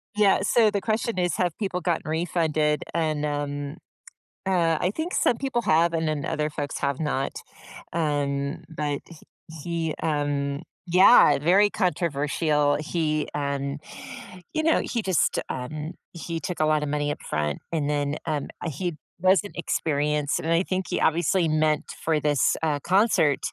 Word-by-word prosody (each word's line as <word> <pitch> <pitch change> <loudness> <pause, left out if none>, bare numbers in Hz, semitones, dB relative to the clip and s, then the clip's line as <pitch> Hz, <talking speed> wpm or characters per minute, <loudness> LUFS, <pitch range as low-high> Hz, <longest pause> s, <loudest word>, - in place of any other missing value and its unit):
Yeah. 205 -3 +4
So 215 +2 +4
the 200 - -1
question 220 -1 -1
is, 175 -3 +1
have 175 -3 0
people 185 -4 -2
gotten 170 -3 -1
refunded? 155 -2 0
And, 155 -3 0
um, 145 0 -3 0.7
uh, 170 -4 +2
I 180 - +1
think 330 +3 -3
some 235 - +2
people 265 -3 -1
have 170 -2 +3
and 160 -1 0
then 150 -3 -1
other 150 0 -1
folks 145 -1 -4
have 140 -1 -1
not. 135 -3 -1 0.6
Um, 145 -1 -1
but 150 -3 -3
h 165 - -12 0.5
he, 165 -2 -2
um 145 -2 -1 0.3
yeah, 180 - +7
very 185 +8 +4
controversial. 150 -5 +1
He, 155 -1 -1
um, 140 -1 -2 0.8
you 315 - 0
know, 325 0 +4
he 235 - -2
just, 185 -6 +1
um, 150 +6 -5 0.2
he 165 0 -4
took 165 +1 -4
a 155 - +4
lotta 155 -1 +2
money 145 0 -1
up - - -6
front, 75 -1 -1 0.2
and, 150 -3 0
then, 145 0 0
um, 150 -2 -2 0.2
uh, - - -1
he 165 +3 -3 0.2
wasn't 190 +2 +2
experienced. 150 -3 0
And 165 - -2
I 170 +2 +3
think 185 0 -2
he - - -1
obviously 170 +2 +2
meant 155 -1 +1
for 155 -2 +1
this, 145 -2 +2
uh, 150 -3 +1
concert 190 -7 +3
155 Hz, 160 wpm, -25 LUFS, 145-180 Hz, 0.8 s, yeah